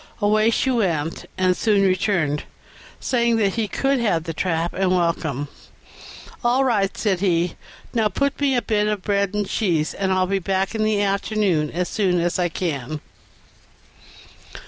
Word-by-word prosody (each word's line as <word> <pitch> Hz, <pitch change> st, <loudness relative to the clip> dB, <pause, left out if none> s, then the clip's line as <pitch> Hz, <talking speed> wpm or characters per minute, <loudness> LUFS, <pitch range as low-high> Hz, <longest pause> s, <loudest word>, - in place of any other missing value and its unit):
Away 215 Hz, +1 st, +3 dB
she 260 Hz, +3 st, +1 dB
went, 170 Hz, -10 st, -1 dB
and 185 Hz, -1 st, +2 dB
soon 205 Hz, -1 st, +2 dB
returned, 185 Hz, -6 st, +1 dB, 0.5 s
saying 235 Hz, -2 st, +1 dB
that 200 Hz, -3 st, +1 dB
he 225 Hz, -2 st, -1 dB
could 270 Hz, +5 st, 0 dB
have 185 Hz, -9 st, +1 dB
the 165 Hz, 0 st, -5 dB
trap 165 Hz, 0 st, -1 dB
and 190 Hz, 0 st, +1 dB
welcome. 165 Hz, -5 st, 0 dB, 1.0 s
"All 245 Hz, +3 st, +3 dB
right," 205 Hz, -7 st, +1 dB
said 195 Hz, -5 st, 0 dB
he; 175 Hz, -2 st, +1 dB, 0.4 s
"now 225 Hz, -3 st, +2 dB
put 280 Hz, +8 st, -1 dB
me 275 Hz, -2 st, +2 dB
up 245 Hz, -, +1 dB
a -, -, -29 dB
bit 210 Hz, -1 st, +1 dB
of 210 Hz, -3 st, -2 dB
bread 200 Hz, -1 st, 0 dB
and 205 Hz, -1 st, -1 dB
cheese, 170 Hz, -9 st, 0 dB
and 190 Hz, -1 st, -1 dB
I'll 185 Hz, 0 st, +2 dB
be 195 Hz, +1 st, 0 dB
back 190 Hz, +2 st, -1 dB
in 220 Hz, -, -2 dB
the 215 Hz, -1 st, +2 dB
afternoon 195 Hz, -5 st, 0 dB
as 180 Hz, +3 st, -2 dB
soon 185 Hz, -4 st, +1 dB
as 175 Hz, +1 st, 0 dB
I 175 Hz, -1 st, +1 dB
can." 155 Hz, -4 st, -3 dB
195 Hz, 170 wpm, -22 LUFS, 175-215 Hz, 1.0 s, Away